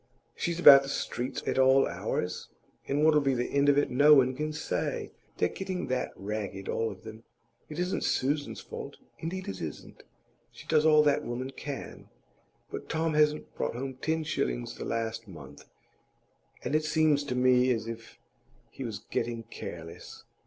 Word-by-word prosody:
She's 170 0 -2
about 140 -5 +10
the 135 - -6
streets 125 -2 -3
at - - 0
all 130 +1 +6
hours, 90 0 -3 0.4
and 145 +2 +2
what'll 155 -1 +5
be 135 -2 +1
the 120 0 -2
end 140 0 +3
of 145 - +4
it 145 - +2
no 145 +4 +7
one 130 -2 +4
can 155 +3 -2
say. 155 0 -3 0.3
They're - - +2
getting 185 - -4
that 130 0 -1
ragged, 100 -1 -5
all 115 0 0
of 95 -3 -11
them. 110 0 -10 0.5
It 155 - -7
isn't 180 +1 -1
Susan's 145 +2 -1
fault; - - -8 0.2
indeed 185 +4 -5
it 95 - -5
isn't. 75 -3 -7 0.5
She - - -13
does 155 -1 +3
all 155 -1 +6
that 145 -1 +2
woman 125 +2 -4
can. 140 +1 -7 0.6
But - - -7
Tom 160 0 0
hasn't 150 0 +2
brought - - -3
home 135 +2 -4
ten 160 +5 -1
shillings - - -2
the - - -6
last 115 0 -3
month, 80 -8 -12 1.0
and 125 - -3
it 155 0 +3
seems 155 -2 +3
to 125 - -3
me 125 0 +4
as 115 -3 0
if 115 0 -8 0.5
he 135 - -7
was 115 -4 -6
getting 115 -1 -2
careless. 85 -6 -9
130 Hz, 175 wpm, -29 LUFS, 115-150 Hz, 1.0 s, about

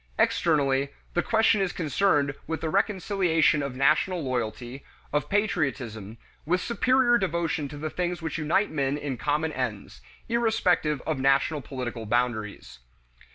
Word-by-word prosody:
Externally, 140 -4 +2 0.2
the 175 - +2
question 220 -1 +3
is 190 -2 0
concerned 150 -3 +1
with 160 +1 -3
the 160 - -2
reconciliation 185 -6 +2
of 140 -2 -4
national 155 +6 +2
loyalty, 125 +1 -4 0.3
of 150 - 0
patriotism, 130 - -1 0.3
with 180 +4 +1
superior 240 +3 +2
devotion 170 -5 -1
to 145 - -9
the 155 +1 -4
things 180 -1 -2
which 160 0 -4
unite 165 +7 +1
men 140 -1 0
in 145 -3 -4
common 150 +5 -1
ends, 105 - -4 0.3
irrespective 220 - +1
of 155 -4 -1
national 140 +3 +2
political 125 -4 -6
boundaries. 110 - -2
150 Hz, 135 wpm, -26 LUFS, 130-180 Hz, 0.3 s, question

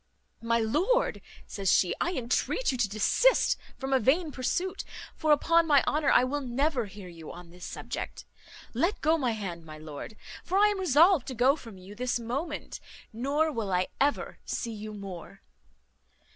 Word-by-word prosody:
"My 230 0 +1
lord," 320 - +1 0.2
says 195 -2 -1
she, 180 - +3
"I 350 - +1
intreat 255 - 0
you 255 - -3
to 215 -4 +2
desist 215 - +3 0.2
from 270 0 -3
a 265 - +5
vain 300 +8 +2
pursuit; 365 +9 -2 0.3
for, 310 - +1
upon 330 +3 +4
my 285 -3 +5
honour, 300 -1 +1
I - - +6
will 285 +3 -1
never 260 -1 0
hear 195 -1 -10
you 165 -3 -10
on 175 -1 -11
this 180 0 -10
subject. - - -6 0.5
Let 365 +5 0
go 315 +1 +4
my 255 -7 0
hand, 185 -6 -5
my 155 -1 -10
lord; 155 +7 -9 0.3
for 375 - -1
I 415 +1 +6
am 410 -2 -2
resolved 340 -2 +4
to 260 - -5
go 255 +4 +4
from 230 -9 -11
you 185 +2 -11
this 245 +2 -1
moment; 275 +7 -4 0.3
nor 285 +7 +1
will 225 -7 -3
I 180 0 +1
ever 285 +1 0
see 230 - -3
you 215 0 -7
more." 195 -4 -9
255 Hz, 175 wpm, -28 LUFS, 205-310 Hz, 0.5 s, I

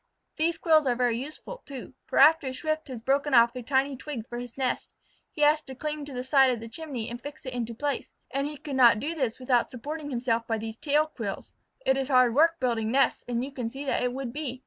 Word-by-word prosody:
These 330 +1 +1
quills 315 -3 +4
are 245 - +2
very 245 -1 +1
useful, 310 - -8
too, 265 -2 -9
for - - -3
after 305 0 +6
a 260 - -3
Swift 310 +2 -2
has 250 -4 -7
broken 275 +3 +1
off 235 +1 +6
a 250 - -4
tiny 270 +2 +1
twig 255 -4 -6
for 240 - -5
his 245 0 -9
nest, 260 -2 -2 0.4
he 300 - -6
has 300 +1 +5
to 265 -3 -10
cling 300 +2 -4
to 285 - -9
the 250 0 -3
side 265 0 +5
of 245 -2 0
the 230 - -8
chimney 255 -2 -5
and 240 +1 -6
fix 290 +1 -9
it 255 - -5
into 235 -2 -3
place, 290 +4 -2 0.2
and 275 +1 -1
he 300 0 -7
could 275 0 -6
not 235 -4 +7
do 300 +8 -2
this 260 -8 -1
without 250 -2 +1
supporting 290 +4 -6
himself 235 -3 -1
by 225 - 0
these 220 0 -5
tail 300 +2 +2
quills. 225 -10 -6 0.3
It 265 - +3
is 270 -1 -1
hard 255 -3 +4
work 330 +5 +4
building 230 -4 0
nests, 270 +2 +2
and 240 +1 -1
you 280 - -8
can 250 -4 -4
see 275 +4 -7
that 270 - 0
it 250 0 0
would 255 -2 -5
be. 270 -4 -4
265 Hz, 250 wpm, -27 LUFS, 240-295 Hz, 0.4 s, not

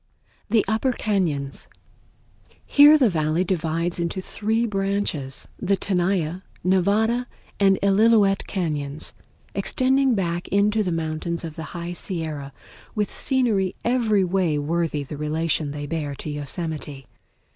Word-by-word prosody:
The 220 0 +3
Upper 225 +5 +1
Cañons 165 -12 -1 1.0
Here 290 +2 +8
the 265 -5 +4
Valley 160 -2 +1
divides 170 -1 -1
into 170 +2 -2
three 220 +4 -1
branches, 195 - -1
the 200 +1 +2
Tenaya, 180 -2 0 0.2
Nevada, 210 +7 +2 0.3
and 195 -1 +5
Illilouette 200 0 +4
Cañons, 150 -6 -3 0.4
extending 265 -1 +2
back 175 -3 -2
into 205 +2 +2
the 185 -4 -1
fountains 165 +1 -2
of 160 -2 -6
the 165 +1 -7
High 170 +1 -4
Sierra, 160 -6 -4 0.4
with 210 -2 0
scenery 225 -9 +1
every 230 -5 +2
way 180 -4 +1
worthy 150 0 -1
the 145 +2 -7
relation 155 0 -1
they 145 0 -5
bear 145 -2 -3
to 150 - -6
Yosemite. 145 -1 -5
180 Hz, 125 wpm, -23 LUFS, 155-205 Hz, 1.0 s, Here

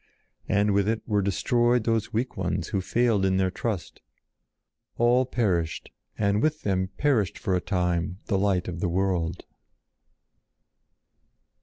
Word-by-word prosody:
And 100 0 +2
with 100 +1 +2
it 110 0 -1
were 105 -3 +2
destroyed 120 +4 +2
those 115 -1 0
weak 120 +3 -2
ones - - -2
who 95 - -1
failed 115 0 +1
in 95 0 +2
their 95 -1 +1
trust. 105 -2 -4 1.0
All 120 +2 +3
perished 90 -11 -1 0.3
and 100 0 +1
with 155 +2 0
them 95 -2 0
perished 125 -10 +1
for 95 - -2
a 90 - +1
time 90 -1 -1
the 100 -4 0
Light 95 -2 +1
of 85 -2 -5
the 90 - 0
World. 90 -2 -1
100 Hz, 140 wpm, -26 LUFS, 95-115 Hz, 1.0 s, All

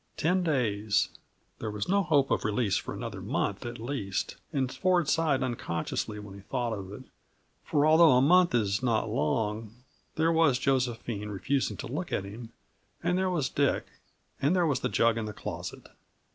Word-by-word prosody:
Ten 180 +4 +2
days 110 - +1 0.5
there 110 - -3
was 105 -1 -3
no 200 +2 +3
hope 145 -6 +2
of - - +1
release 105 -2 +1
for - - -2
another - - -6
month, - - -2
at 120 0 -6
least, 110 -5 -3 0.2
and 130 -4 -1
Ford 180 -4 +2
sighed 150 -4 +2
unconsciously 110 -3 -3
when 105 -2 -9
he 100 - -10
thought 120 +2 -2
of 95 -2 -6
it; 105 +6 -9 0.6
for 145 0 +2
although 160 -1 +7
a 125 - +5
month 175 +3 +5
is 105 -2 +1
not 115 -4 0
long, 105 +7 -1 0.4
there 160 +1 +2
was 160 -6 +4
Josephine 120 -5 -1
refusing 105 +1 -1
to - - -6
look 155 +9 -4
at - - 0
him, 110 +4 -9 0.5
and 180 - +1
there 185 0 +1
was 155 -7 0
Dick 140 -1 +1 0.6
and 145 +7 +3
there 180 -2 +3
was 145 -4 +1
the 125 - -1
jug 115 +2 +2
in 110 - -3
the 105 - -5
closet. - - -7
125 Hz, 180 wpm, -29 LUFS, 105-155 Hz, 0.6 s, although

